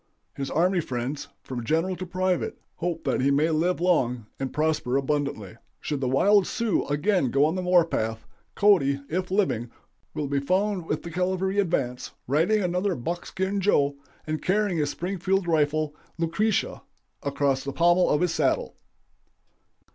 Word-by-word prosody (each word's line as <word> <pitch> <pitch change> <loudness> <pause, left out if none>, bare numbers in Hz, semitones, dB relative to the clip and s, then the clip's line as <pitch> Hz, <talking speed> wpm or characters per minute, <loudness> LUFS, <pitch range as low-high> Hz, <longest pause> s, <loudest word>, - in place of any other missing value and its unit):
His 135 -1 -4
army 180 +3 +2
friends, 130 -1 -3 0.2
from 125 -3 -5
general 165 +9 0
to 185 - -6
private, 185 0 -1 0.2
hope 170 -1 -3
that 135 -2 0
he 135 - +3
may 150 +4 +2
live 170 +3 +1
long 125 -10 +1
and 135 -1 -3
prosper 150 -4 0
abundantly. 140 -8 -2 0.2
"Should 145 -3 -3
the 130 - 0
wild 195 +9 +4
Sioux 230 -4 0
again 150 +1 +1
go 140 +4 +3
on 155 - +1
the 185 - -2
war 180 -2 +4
path, 110 -7 -3 0.3
Cody, 140 -9 +3
if 180 +3 -2
living, 185 - 0 0.5
will 150 - -2
be 140 0 0
found 185 +4 0
with 150 - -2
the 170 - -7
cavalry 185 +3 0
advance, 125 -10 -1
riding 175 - +2
another 180 +2 0
'Buckskin 190 +8 -3
Joe,' 145 -8 +2 0.3
and 155 0 -3
carrying 195 -2 +1
his 145 -1 +1
Springfield 190 +3 -1
rifle, 155 -1 +1 0.2
'Lucretia,' 170 +6 0 0.4
across 140 -1 0
the 140 - -4
pommel 175 +4 +3
of 150 - +2
his 180 -2 +1
saddle." 150 -4 0
165 Hz, 155 wpm, -26 LUFS, 140-185 Hz, 0.5 s, wild